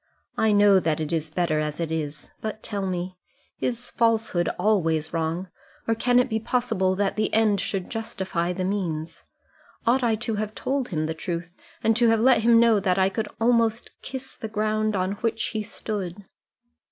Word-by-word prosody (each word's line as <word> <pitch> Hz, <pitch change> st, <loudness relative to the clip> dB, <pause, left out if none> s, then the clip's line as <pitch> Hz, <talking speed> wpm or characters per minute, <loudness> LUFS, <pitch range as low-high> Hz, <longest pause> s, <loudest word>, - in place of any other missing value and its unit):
I 220 Hz, -, +3 dB
know 205 Hz, -1 st, +6 dB
that 160 Hz, -3 st, 0 dB
it 155 Hz, -1 st, -3 dB
is 160 Hz, -1 st, -1 dB
better 160 Hz, -1 st, 0 dB
as 150 Hz, 0 st, -3 dB
it 165 Hz, -1 st, -2 dB
is; 150 Hz, -3 st, -4 dB
but 215 Hz, 0 st, -5 dB
tell 200 Hz, -2 st, -3 dB
me 180 Hz, 0 st, -4 dB, 0.4 s
is 245 Hz, 0 st, -2 dB
a -, -, -27 dB
falsehood 225 Hz, -6 st, +2 dB
always 165 Hz, -6 st, +1 dB
wrong, 165 Hz, +3 st, -1 dB, 0.4 s
or 225 Hz, -, +3 dB
can 245 Hz, +2 st, +2 dB
it 250 Hz, -, +4 dB
be 220 Hz, -3 st, -1 dB
possible 220 Hz, -5 st, 0 dB
that 200 Hz, +1 st, 0 dB
the 215 Hz, -1 st, +1 dB
end 215 Hz, -3 st, +3 dB
should 190 Hz, -3 st, -2 dB
justify 190 Hz, -6 st, -2 dB
the 185 Hz, +1 st, -2 dB
means? 170 Hz, -5 st, -3 dB, 0.6 s
Ought 245 Hz, +3 st, +3 dB
I 235 Hz, -3 st, +2 dB
to 225 Hz, 0 st, -3 dB
have 215 Hz, +1 st, -3 dB
told 270 Hz, -1 st, -1 dB
him 155 Hz, -3 st, -1 dB
the 160 Hz, -, -2 dB
truth, 170 Hz, +1 st, -5 dB, 0.3 s
and 225 Hz, 0 st, +3 dB
to 240 Hz, -1 st, +4 dB
have 225 Hz, -1 st, +4 dB
let 240 Hz, -1 st, +5 dB
him 230 Hz, 0 st, +6 dB
know 230 Hz, -2 st, +5 dB
that 185 Hz, -2 st, +1 dB
I 190 Hz, 0 st, +4 dB
could 215 Hz, +2 st, -3 dB
almost 230 Hz, -1 st, +2 dB
kiss 265 Hz, 0 st, -6 dB
the 220 Hz, -, -6 dB
ground 215 Hz, 0 st, 0 dB
on 185 Hz, 0 st, 0 dB
which 225 Hz, -1 st, 0 dB
he 215 Hz, -, -2 dB
stood?" 205 Hz, -3 st, -5 dB
205 Hz, 190 wpm, -25 LUFS, 175-225 Hz, 0.6 s, know